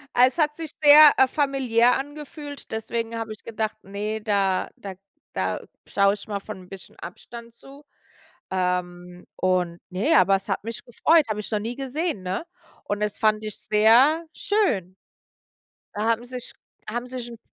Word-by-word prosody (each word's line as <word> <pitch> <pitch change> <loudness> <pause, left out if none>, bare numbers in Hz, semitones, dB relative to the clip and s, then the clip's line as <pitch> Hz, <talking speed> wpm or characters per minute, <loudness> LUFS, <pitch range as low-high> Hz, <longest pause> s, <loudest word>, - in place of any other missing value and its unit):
Es 250 +4 +4
hat 300 -1 +2
sich 320 -2 -6
sehr, 295 0 +10
äh, 265 - +6
familiär 255 -4 +2
angefühlt, 290 +1 -8
deswegen 230 +1 -3
habe 225 -1 -5
ich 215 - -10
gedacht: 220 -1 -3
„Ne, 210 +2 -4
da 200 -3 +1
da 195 -2 -8 0.4
da - - -2 0.3
schaue 200 0 +3
ich 205 - -11
mal 200 -1 -3
von 210 0 -8
'n 180 - -18
bisschen 195 -2 -12
Abstand 235 +6 -10
zu.“ 275 +4 -15 0.7
Ähm, 180 -1 -3
und, 180 -2 0
ne, 200 - +1
aber 190 +1 +5
es 195 - -12
hat 195 - -1
mich 230 +1 -6
gefreut, 310 +6 +3
habe 210 0 -2
ich 210 - -6
noch 210 - +1
nie 230 +3 -4
gesehen, 275 - -3
ne? 190 - -3 0.4
Und 205 0 -3
es 210 -1 -2
fand 215 -1 +2
ich 215 - -6
sehr 235 +10 +4
schön. 200 - 0 1.0
Da 210 - -3
haben 230 +1 +1
sich 250 0 -7 0.4
haben 240 +3 -3
sich 250 -1 -6
'n 235 - -10
220 Hz, 170 wpm, -24 LUFS, 200-265 Hz, 1.0 s, sehr